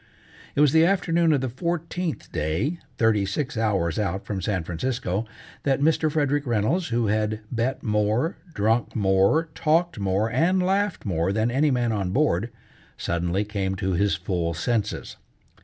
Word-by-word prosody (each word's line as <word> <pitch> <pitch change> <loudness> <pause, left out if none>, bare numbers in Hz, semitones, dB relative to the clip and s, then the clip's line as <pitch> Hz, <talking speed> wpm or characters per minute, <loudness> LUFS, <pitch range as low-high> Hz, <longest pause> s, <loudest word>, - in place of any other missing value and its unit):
It 145 - +3
was 150 -2 +5
the 160 +1 +5
afternoon 170 -2 +2
of 145 -4 +2
the 130 - -1
fourteenth 170 +5 -3
day, 85 - -1 0.2
thirty 110 -3 +3
six 125 +8 -2
hours 100 -6 0
out 95 -1 -2
from 100 -3 -3
San 95 -2 -1
Francisco, 105 +3 -2 0.3
that 135 -1 +1
Mr. 155 +1 +2
Frederick 145 -2 0
Reynolds, 120 - +1
who 120 -1 0
had 110 +1 0
bet 125 +2 -1
more, 105 - +1 0.2
drunk 110 +3 +1
more, 100 +10 +3
talked 165 -2 +1
more, 100 +2 +1
and 165 +10 +2
laughed 195 +1 0
more 85 -2 0
than 110 +3 +1
any 145 +4 +2
man 120 -3 +1
on 100 -4 -1
board, 115 - +1 0.5
suddenly 85 +4 -1
came 100 -2 -2
to 95 -1 -2
his 100 +3 +2
full 90 -3 -2
senses. 110 +5 -2
115 Hz, 155 wpm, -25 LUFS, 100-150 Hz, 0.5 s, was